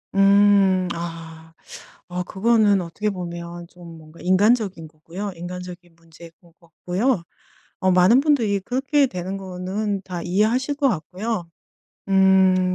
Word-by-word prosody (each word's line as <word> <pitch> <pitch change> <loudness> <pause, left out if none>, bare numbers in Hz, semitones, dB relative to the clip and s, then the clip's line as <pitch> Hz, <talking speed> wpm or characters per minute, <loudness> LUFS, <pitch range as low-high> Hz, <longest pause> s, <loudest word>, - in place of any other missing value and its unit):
음 195 -2 +4
아. 165 -1 -8 0.6
어 180 0 -3
그거는 205 0 +2
어떻게 200 +5 -3
보면 170 -1 -7
좀 170 -2 -13
뭔가 155 +1 -16
인간적인 195 -2 +1
거고요. 165 +6 -7
인간적인 175 0 -9
문제인 165 0 -16
것 170 -2 -23
같고요. 180 +5 -2 0.6
어 185 0 +2
많은 185 +8 +5
분들이 235 -10 +1
그렇게 270 +6 +1
되는 185 -1 -5
거는 190 +2 -4
다 175 -2 -6
이해하실 225 +10 0
것 280 -1 +1
같고요. 185 +1 -4 0.6
음 190 -1 +4
185 Hz, 260 characters per minute, -22 LUFS, 170-205 Hz, 0.6 s, 많은